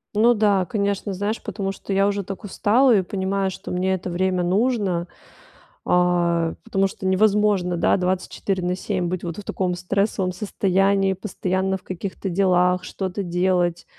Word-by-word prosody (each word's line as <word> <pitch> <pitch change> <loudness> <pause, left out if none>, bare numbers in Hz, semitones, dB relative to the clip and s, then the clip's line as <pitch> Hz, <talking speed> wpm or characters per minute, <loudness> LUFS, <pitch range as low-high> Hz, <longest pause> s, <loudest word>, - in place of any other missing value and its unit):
Ну 230 +3 +5
да, 205 -4 +2
конечно. 200 +1 -1
Знаешь, 205 +4 -2
потому 195 -2 -3
что 195 0 -6
я 195 +1 +3
уже 200 0 -1
так 195 +3 -7
устала 230 +5 +3
и 195 - +4
понимаю, 190 +1 -1
что - - -8
мне 185 +1 0
это 185 0 -3
время 180 +1 0
нужно, 190 -2 +1 0.8
а, 175 -2 +2
потому 195 -4 +1
что 190 - -9
невозможно, 200 -2 +2
да, - - +3
24 185 +1 -2
на 180 +1 0
7 185 -1 -2
быть 180 0 -3
вот 170 -1 -5
в 210 - -7
таком 185 -2 -2
стрессовом 190 +1 -1
состоянии, 195 0 +1
постоянно 190 -1 -2
в - - -22
каких-то 190 +1 -5
делах, 180 -1 +2
что-то 190 +1 -4
делать. 175 -1 0
190 Hz, 160 wpm, -22 LUFS, 180-200 Hz, 0.8 s, Ну